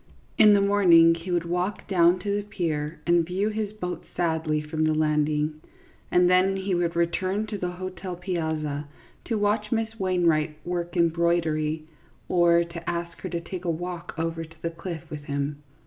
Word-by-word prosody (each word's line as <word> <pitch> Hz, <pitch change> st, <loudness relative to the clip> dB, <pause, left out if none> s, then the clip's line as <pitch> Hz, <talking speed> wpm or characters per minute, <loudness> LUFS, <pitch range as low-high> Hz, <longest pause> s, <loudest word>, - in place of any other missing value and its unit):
In 210 Hz, -1 st, +7 dB
the 200 Hz, -, +4 dB
morning 180 Hz, -5 st, +6 dB
he 165 Hz, +2 st, -7 dB
would 175 Hz, -1 st, 0 dB
walk 180 Hz, +4 st, -2 dB
down 175 Hz, -2 st, +4 dB
to 200 Hz, +1 st, -1 dB
the -, -, -1 dB
pier 165 Hz, -7 st, -3 dB
and 170 Hz, 0 st, +4 dB
view 185 Hz, +5 st, -1 dB
his 215 Hz, -1 st, -3 dB
boat 180 Hz, -4 st, -5 dB
sadly 160 Hz, -3 st, 0 dB
from 150 Hz, +1 st, -2 dB
the 155 Hz, 0 st, +2 dB
landing, 150 Hz, 0 st, +1 dB, 0.5 s
and 180 Hz, 0 st, +4 dB
then 185 Hz, +2 st, +4 dB
he 190 Hz, 0 st, -2 dB
would 175 Hz, -1 st, 0 dB
return 185 Hz, +5 st, 0 dB
to 210 Hz, -1 st, -5 dB
the 180 Hz, -, -1 dB
hotel 185 Hz, 0 st, -6 dB
piazza. 160 Hz, -5 st, -3 dB, 0.4 s
to 230 Hz, -, -1 dB
watch 210 Hz, +1 st, 0 dB
Miss 225 Hz, -1 st, -1 dB
Wainwright 170 Hz, -5 st, +1 dB
work 175 Hz, 0 st, -3 dB
embroidery, 165 Hz, -2 st, +1 dB, 0.4 s
or 170 Hz, -1 st, +4 dB
to 170 Hz, 0 st, -7 dB
ask 170 Hz, 0 st, -4 dB
her 185 Hz, -, -5 dB
to 170 Hz, -1 st, -3 dB
take 180 Hz, +1 st, -7 dB
a -, -, 0 dB
walk 175 Hz, +1 st, -4 dB
over 165 Hz, 0 st, -2 dB
to 160 Hz, 0 st, -15 dB
the 170 Hz, -, -1 dB
cliff 165 Hz, -1 st, -7 dB
with 150 Hz, -1 st, -7 dB
him. 140 Hz, +1 st, -3 dB
170 Hz, 180 wpm, -26 LUFS, 160-185 Hz, 0.5 s, In